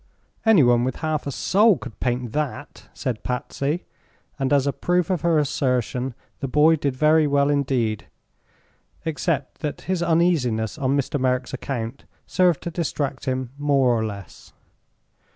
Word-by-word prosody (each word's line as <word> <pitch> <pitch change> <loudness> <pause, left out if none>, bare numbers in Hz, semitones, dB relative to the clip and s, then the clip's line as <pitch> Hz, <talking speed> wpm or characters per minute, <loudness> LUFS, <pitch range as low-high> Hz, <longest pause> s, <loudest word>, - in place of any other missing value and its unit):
"Anyone 125 - +5
with 130 0 -1
half 155 -2 -2
a - - -2
soul 205 - +3
could 115 - -10
paint 125 -2 -1
that!" 145 0 -4
said 120 -5 -4
Patsy; 140 +5 -2 0.5
and 135 0 0
as 140 -2 +3
a 140 - 0
proof 180 0 0
of 180 -5 0
her 170 -1 +3
assertion 130 -3 0 0.2
the 135 - -3
boy 150 +5 +5
did 140 -4 -2
very 155 +2 +4
well 140 0 +2
indeed, 130 -7 0 1.0
except 155 -3 -2
that 150 -2 -4
his 185 -2 -2
uneasiness 160 -9 +1
on 135 0 +1
Mr. 140 +1 -1
Merrick's 130 0 0
account 125 -1 -5 0.2
served 180 -5 +2
to 170 - -4
distract 145 -5 -3
him 130 -1 -2
more 140 -3 +3
or 110 - 0
less. 100 -4 -8
140 Hz, 150 wpm, -23 LUFS, 125-155 Hz, 1.0 s, Anyone